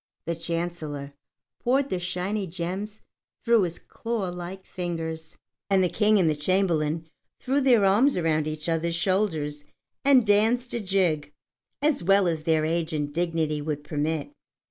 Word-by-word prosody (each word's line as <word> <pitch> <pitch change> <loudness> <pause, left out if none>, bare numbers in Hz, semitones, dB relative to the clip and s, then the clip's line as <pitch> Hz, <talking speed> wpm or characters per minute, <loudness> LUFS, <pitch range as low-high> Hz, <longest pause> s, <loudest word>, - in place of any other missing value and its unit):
The 170 - -1
Chancellor 165 -4 -4 0.5
poured 265 +3 +2
the 185 - 0
shining 185 +2 -2
gems 190 +5 -4 0.4
through 230 -2 +5
his 175 -3 -2
claw 225 -5 -4
like 180 +2 -7
fingers, 160 -3 -5 0.3
and 195 -1 +4
the 180 - +2
King 210 +2 +3
and 180 -4 +3
the 155 - +2
Chamberlain 160 -1 0 0.3
threw 270 +2 +1
their 245 -6 +5
arms 220 +8 +4
around 155 -3 +1
each 155 +1 -5
others' 165 0 0
shoulders 165 -5 0 0.4
and 270 -4 +5
danced 225 +4 +2
a 235 - -1
jig 185 -8 0 0.5
as 300 -7 +2
well 195 +1 +4
as 160 -2 -2
their 160 -1 +2
age 165 0 -1
and 145 -1 -2
dignity 165 -3 0
would 145 -1 -3
permit. 155 - -2
175 Hz, 150 wpm, -26 LUFS, 160-205 Hz, 0.5 s, through